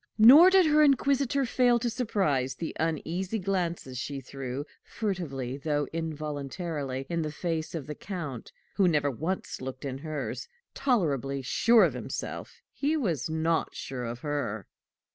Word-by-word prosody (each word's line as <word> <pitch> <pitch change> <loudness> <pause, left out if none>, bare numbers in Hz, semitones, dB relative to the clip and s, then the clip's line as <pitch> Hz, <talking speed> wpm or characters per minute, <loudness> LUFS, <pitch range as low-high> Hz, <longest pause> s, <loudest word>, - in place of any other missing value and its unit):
Nor 275 +11 +10
did 375 -1 +6
her 305 0 +5
inquisitor 275 -1 +3
fail 245 0 +3
to 240 +1 -1
surprise 190 - 0
the 165 +4 -5
uneasy 165 +6 -1
glances 175 - -2
she 140 -1 -4
threw, 135 +1 -5 0.2
furtively 145 - -3
though 145 0 -1
involuntarily, 150 -3 -4
in 170 -1 -1
the 155 -1 -3
face 160 0 -3
of 155 -5 -4
the 150 - -5
Count 150 - -6 0.3
who 195 -3 +5
never 150 -4 +2
once 160 +7 -3
looked 130 +1 -6
in 135 -1 -4
hers: 155 - -4 0.3
tolerably 140 - 0
sure 230 - +5
of - - +3
himself, - - -6
he 300 +3 0
was 175 - -1
not 160 +1 0
sure 125 -2 -5
of 120 +1 -5
her. 140 - -3
160 Hz, 145 wpm, -28 LUFS, 140-205 Hz, 0.3 s, Nor